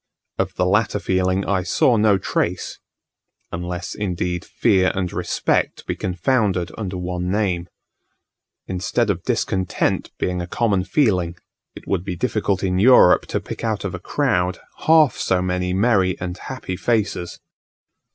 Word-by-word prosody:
Of -, -, -1 dB
the 90 Hz, -, +1 dB
latter 105 Hz, +3 st, +2 dB
feeling 95 Hz, 0 st, 0 dB
I 95 Hz, -2 st, +1 dB
saw 105 Hz, +7 st, +2 dB
no 105 Hz, -2 st, +4 dB
trace, 90 Hz, -1 st, -2 dB, 0.7 s
unless, 90 Hz, +1 st, -4 dB
indeed, 90 Hz, -3 st, -2 dB
fear 95 Hz, -5 st, +2 dB
and 90 Hz, -2 st, -2 dB
respect -, -, -1 dB
be -, -, -2 dB
confounded 95 Hz, -1 st, 0 dB
under 95 Hz, -4 st, -4 dB
one 90 Hz, 0 st, -3 dB
name. 95 Hz, -4 st, 0 dB, 1.0 s
Instead 100 Hz, +4 st, 0 dB
of 90 Hz, -3 st, -4 dB
discontent 95 Hz, +1 st, -1 dB
being 90 Hz, -1 st, -1 dB
a 85 Hz, -, -5 dB
common 100 Hz, -2 st, 0 dB
feeling, 90 Hz, -, +1 dB, 0.4 s
it -, -, -12 dB
would 95 Hz, -3 st, 0 dB
be 95 Hz, -2 st, -4 dB
difficult 100 Hz, -1 st, -1 dB
in 90 Hz, -1 st, +1 dB
Europe 115 Hz, -4 st, +6 dB
to -, -, -1 dB
pick -, -, -8 dB
out -, -, -1 dB
of -, -, -3 dB
a -, -, -5 dB
crowd 90 Hz, 0 st, 0 dB, 0.3 s
half 155 Hz, -5 st, +5 dB
so 95 Hz, -, +1 dB
many 90 Hz, 0 st, -1 dB
merry 95 Hz, -2 st, +2 dB
and 90 Hz, -1 st, -4 dB
happy 125 Hz, -8 st, -6 dB
faces. 105 Hz, -5 st, -1 dB
95 Hz, 145 wpm, -21 LUFS, 90-105 Hz, 1.0 s, Europe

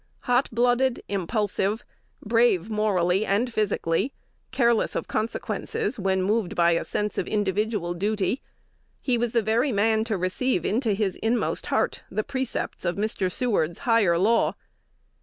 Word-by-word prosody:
Hot 245 Hz, +2 st, +2 dB
blooded, 245 Hz, +2 st, +2 dB
impulsive, 205 Hz, +2 st, -1 dB, 0.4 s
brave 225 Hz, -3 st, +2 dB
morally 195 Hz, -3 st, +2 dB
and 225 Hz, +4 st, 0 dB
physically, 205 Hz, +1 st, 0 dB, 0.4 s
careless 235 Hz, -3 st, +2 dB
of -, -, -2 dB
consequences 250 Hz, -, -2 dB
when 190 Hz, -1 st, +1 dB
moved 210 Hz, -1 st, 0 dB
by 170 Hz, 0 st, +4 dB
a 170 Hz, -, +1 dB
sense 210 Hz, 0 st, -2 dB
of -, -, -2 dB
individual 205 Hz, -2 st, -1 dB
duty, 205 Hz, +6 st, -1 dB, 0.6 s
he 255 Hz, -, 0 dB
was 235 Hz, -1 st, -1 dB
the 230 Hz, -2 st, +2 dB
very 230 Hz, +6 st, +1 dB
man 220 Hz, +1 st, +2 dB
to 220 Hz, -3 st, -1 dB
receive 185 Hz, +2 st, 0 dB
into 225 Hz, 0 st, +1 dB
his 195 Hz, -2 st, -1 dB
inmost 225 Hz, 0 st, -1 dB
heart -, -, 0 dB
the 215 Hz, -, -2 dB
precepts 260 Hz, 0 st, -4 dB
of 175 Hz, -1 st, 0 dB
Mr. 200 Hz, -3 st, -1 dB
Seward's 200 Hz, -10 st, +1 dB
"higher 220 Hz, -8 st, +4 dB
law." 220 Hz, +6 st, +2 dB
215 Hz, 140 wpm, -25 LUFS, 190-235 Hz, 0.6 s, by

